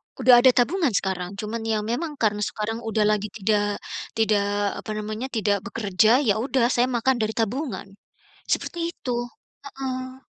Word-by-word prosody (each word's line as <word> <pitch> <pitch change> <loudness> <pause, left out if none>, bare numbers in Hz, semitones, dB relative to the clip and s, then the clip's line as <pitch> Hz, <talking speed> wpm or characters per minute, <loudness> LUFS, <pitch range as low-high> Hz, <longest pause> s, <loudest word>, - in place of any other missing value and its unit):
Udah 250 -1 +7
ada 255 +1 +7
tabungan 275 - +2
sekarang. 190 -1 -2
Cuman 215 +3 -4
ya 215 -1 0
memang 290 +8 -3
karena 210 -5 +1
sekarang 215 +2 -2
udah 225 -2 0
lagi 210 0 +1
tidak 205 0 0 0.3
tidak 205 -2 +1
apa 215 - -6
namanya, 215 +4 -4
tidak 210 -5 0
bekerja. 215 +5 +3
Ya 215 -4 +2
udah, 250 0 +1
saya 245 +1 +3
makan 250 +1 +1
dari 220 0 0
tabungan, 225 -3 -2 0.6
seperti 340 0 -1
itu. 245 -2 -3 0.5
Heeh. 260 -1 -6
225 Hz, 150 wpm, -24 LUFS, 210-255 Hz, 0.6 s, Udah